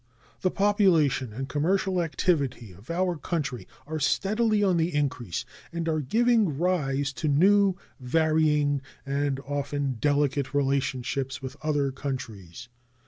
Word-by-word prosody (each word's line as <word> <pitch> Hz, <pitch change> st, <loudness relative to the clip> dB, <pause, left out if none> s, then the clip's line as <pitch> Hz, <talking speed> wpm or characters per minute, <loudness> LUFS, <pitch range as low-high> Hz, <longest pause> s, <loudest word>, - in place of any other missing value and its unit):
The 185 Hz, -, +1 dB
population 180 Hz, -, +2 dB
and 130 Hz, +5 st, -5 dB
commercial 185 Hz, +5 st, +1 dB
activity 145 Hz, -, -1 dB
of 100 Hz, -, -17 dB
our 175 Hz, 0 st, 0 dB
country 145 Hz, -5 st, -3 dB, 0.2 s
are 155 Hz, +2 st, -4 dB
steadily 215 Hz, -, +1 dB
on 185 Hz, -3 st, +3 dB
the 165 Hz, -1 st, 0 dB
increase, 130 Hz, -, -2 dB, 0.3 s
and 170 Hz, -1 st, -3 dB
are 155 Hz, -1 st, +1 dB
giving 220 Hz, -, +2 dB
rise 140 Hz, -6 st, 0 dB
to 155 Hz, -, -3 dB
new, 190 Hz, +6 st, +4 dB, 0.2 s
varying, 150 Hz, 0 st, +2 dB, 0.2 s
and 140 Hz, 0 st, -1 dB
often 140 Hz, -2 st, -2 dB
delicate 145 Hz, -2 st, +1 dB
relationships 135 Hz, -1 st, -1 dB
with 130 Hz, 0 st, -6 dB
other 145 Hz, -3 st, 0 dB
countries. 125 Hz, -, -6 dB
145 Hz, 125 wpm, -27 LUFS, 135-175 Hz, 0.3 s, new